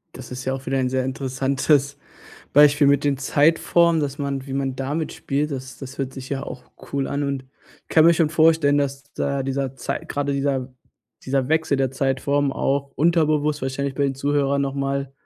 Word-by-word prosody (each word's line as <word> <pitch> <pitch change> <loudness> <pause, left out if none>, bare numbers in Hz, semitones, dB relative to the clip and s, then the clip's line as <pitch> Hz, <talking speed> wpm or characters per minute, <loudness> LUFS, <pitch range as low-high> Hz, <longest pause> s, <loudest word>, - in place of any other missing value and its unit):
Das 130 0 -10
ist 125 0 -6
ja 130 - 0
auch 135 0 -6
wieder 135 +1 0
ein 130 -1 +1
sehr 130 0 0
interessantes 135 +2 0 0.6
Beispiel 145 0 +6
mit 140 0 +3
den 140 -1 +2
Zeitformen, 165 +4 +3
dass 140 -1 -3
man 140 -2 -3
wie 135 - -5
man 135 -1 -1
damit 145 +4 -3
spielt, 145 +2 -2
das 130 -1 -7
das 135 0 -9
hört 135 -1 -3
sich 130 -1 -8
ja 135 -1 -3
auch 125 -3 -8 0.3
cool 140 -1 0
an, 145 +1 -2
und 140 -2 -2 0.4
ich - - -53
kann 160 - +5
mir 170 - +7
schon 160 -2 +2
vorstellen, 160 -3 +4
dass 140 0 -2
da 140 -1 -1
dieser 135 -1 -2
Zeit 135 +2 -4
gerade 140 0 -1
dieser 135 -2 -1 0.5
dieser 130 0 0
Wechsel 160 -2 +1
der 135 -1 0
Zeitform 135 +1 0
auch 140 +1 -1
unterbewusst 150 -2 +2
wahrscheinlich 135 +1 -2
bei 145 - -1
den 135 -1 +1
Zuhörern 140 0 +1
noch 135 0 -2
mal, 140 0 -2
140 Hz, 195 wpm, -22 LUFS, 135-145 Hz, 0.6 s, mir